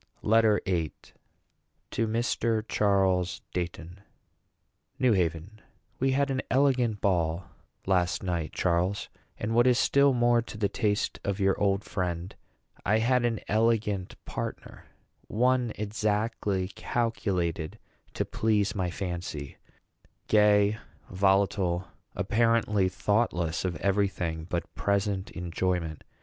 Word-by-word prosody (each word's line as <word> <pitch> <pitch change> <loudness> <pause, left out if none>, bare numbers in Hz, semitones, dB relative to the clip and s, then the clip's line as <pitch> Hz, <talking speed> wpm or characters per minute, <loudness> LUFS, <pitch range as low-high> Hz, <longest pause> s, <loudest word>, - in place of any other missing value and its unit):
LETTER 110 -1 +4
VIII. 85 -5 -1 1.0
TO 115 - 0
MR. 115 -1 0
CHARLES 95 -3 +1
DEIGHTON. 85 0 -5 1.0
NEW 130 -4 +3
HAVEN. 90 +3 -2 0.4
We 135 +1 +2
had 140 +1 +1
an 130 0 0
elegant 130 -5 +2
ball, 85 -2 +1 0.4
last 90 -2 +1
night, 85 -4 -2
Charles; 90 +3 0 0.3
and 105 +2 -2
what 120 +2 +5
is 125 -1 +4
still 140 +1 +4
more 120 -1 +3
to 115 - -9
the 105 -1 +1
taste 105 -1 -1
of 100 0 -2
your 95 -1 +3
old 100 0 +2
friend, 90 -2 -3 0.5
I 105 +3 +3
had 120 +2 +2
an 115 -3 -1
elegant 105 -3 +1
partner; - - -6 0.4
one 125 +1 +2
exactly 105 -2 -1
calculated 95 -8 -2 0.4
to - - 0
please 105 -2 +1
my 95 -3 -1
fancy 85 -6 -5 0.7
gay, 105 0 +4 0.3
volatile, 95 -2 +2 0.3
apparently 105 -1 +2
thoughtless 90 -5 0
of 90 -2 -1
every 100 +1 +2
thing 80 -4 -4
but 85 - -3
present 100 -1 -1
enjoyment. 90 -2 -2
100 Hz, 115 wpm, -28 LUFS, 90-110 Hz, 1.0 s, what